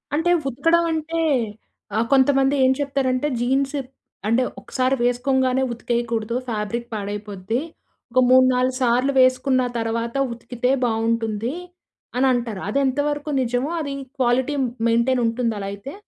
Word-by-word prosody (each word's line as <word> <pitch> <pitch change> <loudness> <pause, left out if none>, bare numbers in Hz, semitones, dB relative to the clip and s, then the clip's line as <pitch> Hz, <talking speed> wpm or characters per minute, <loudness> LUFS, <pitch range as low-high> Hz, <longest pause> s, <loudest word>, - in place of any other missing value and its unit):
అంటే 340 +3 +2 0.2
ఉతకడం 330 +7 +2
అంటే 325 +1 -2 0.7
ఆహ్, 225 +1 +2
కొంతమంది 270 0 +4
ఏం 260 - +5
చెప్తారంటే, 275 -1 0
"జీన్స్ 270 +3 0 0.5
అంటే. 235 +3 +3 0.2
ఒక్క‌సారి 260 +1 0
వేసుకోంగానే 255 +1 +1
ఉతికేయకూడదు. 235 -1 -2
ఫ్యాబ్రిక్ 230 +2 -3
పాడైపోద్ది. 205 +1 -3 0.5
ఒక 255 - +3
మూడు, 255 0 +7
నాలుగు 255 +1 +1
సార్లు 250 +3 +2
వేసుకున్న 255 0 +3 0.2
తర్వాత 230 +2 -2 0.2
ఉతికితే 240 +2 -2
బాగుంటుంది" 225 +1 -1 0.6
అని 265 +1 +3
అంటారు. 230 -5 -3
అదెంతవరకు 290 +4 0
నిజమో, 250 +5 -1
అది 280 -2 -4 0.3
క్వాలిటీ 255 +3 +2 0.3
మెయింటైన్ 235 +2 +2
ఉంటుంది 230 0 0
అలా 195 - -4
అయితే? 200 - -8
250 Hz, 120 wpm, -22 LUFS, 230-270 Hz, 0.7 s, మూడు